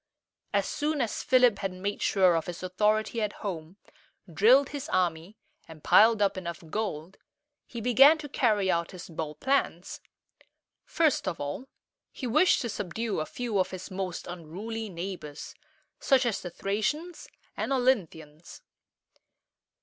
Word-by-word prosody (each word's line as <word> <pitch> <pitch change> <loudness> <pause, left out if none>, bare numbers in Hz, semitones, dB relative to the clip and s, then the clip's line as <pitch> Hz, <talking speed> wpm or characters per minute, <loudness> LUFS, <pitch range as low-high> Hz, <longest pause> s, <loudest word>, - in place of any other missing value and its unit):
As - - +1
soon 300 0 -1
as 235 -4 -1
Philip 250 -5 +4
had 195 - -2
made 195 +3 -4
sure 185 -4 +3
of 165 - -2
his 175 0 -6
authority 215 +5 0
at 210 -1 -1
home, 170 -1 -5 0.6
drilled 255 - +5
his 290 +1 -6
army, 175 +2 -1 0.3
and 160 -2 -13
piled 220 -1 +5
up 195 -1 +1
enough 170 -2 -6
gold, 190 -5 -4 0.5
he 235 - -7
began 270 +7 +6
to 305 -1 -7
carry 210 -8 +1
out 170 -1 -1
his 180 - -9
bold 155 -2 -6
plans. 275 0 -1 0.8
First 315 -10 +1
of 180 - -3
all, 145 - -5 0.4
he 260 - -7
wished 305 +10 +3
to 240 - -2
subdue 210 +2 -3
a 155 - -3
few 235 -5 -2
of 185 - +1
his 185 +1 -8
most 185 -2 -4
unruly 195 +7 -6
neighbors, 175 -4 -7 0.5
such 265 -2 +3
as 230 -4 -1
the 180 - -6
Thracians 255 - -3 0.3
and - - -3
O 270 - +3
lyn´thi 220 -11 +1
ans. 150 +3 -15
200 Hz, 150 wpm, -28 LUFS, 175-245 Hz, 0.8 s, began